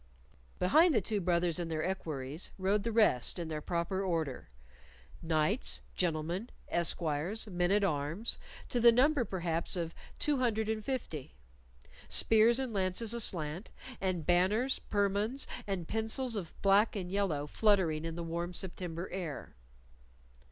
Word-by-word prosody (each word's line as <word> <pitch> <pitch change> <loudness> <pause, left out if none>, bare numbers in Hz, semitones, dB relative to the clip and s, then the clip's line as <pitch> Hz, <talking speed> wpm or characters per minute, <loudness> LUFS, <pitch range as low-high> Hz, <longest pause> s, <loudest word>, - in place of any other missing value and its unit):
Behind 310 - +5
the - - +5
two 210 +1 -1
brothers 175 -1 +1
and 170 -1 -3
their 155 -1 -2
equerries 155 -5 -4
rode 195 +2 +1
the 230 - -2
rest 210 - +3
in 170 -2 -4
their 155 -1 -3
proper 175 +4 -1
order 165 - -2 0.7
knights, 160 +7 +2
gentlemen, 175 +5 -1 0.2
esquires, 170 +4 0
men 180 -4 0
at 205 +1 +3
arms 165 +5 -1 0.3
to 245 - 0
the 235 0 +8
number, 270 +3 +3
perhaps, 170 -5 -2
of 170 -2 -3 0.2
two 295 -2 +1
hundred 220 -4 0
and 220 -1 -2
fifty; 185 - -4 0.7
spears 225 +2 +5
and 260 -3 -2
lances 195 +3 0
aslant, 175 -5 -2 0.3
and 185 -5 -1
banners, 200 +9 +2
permons, 205 +5 +1 0.2
and 185 -5 -3
pencels 225 +2 -1
of 185 -6 -6
black 200 +3 +4
and 180 -3 -4
yellow 190 -8 0
fluttering 170 -3 +2
in 165 0 -4
the 170 - -4
warm 170 +2 -4
September 175 -1 -4
air. 175 - -5
185 Hz, 140 wpm, -32 LUFS, 165-220 Hz, 0.7 s, the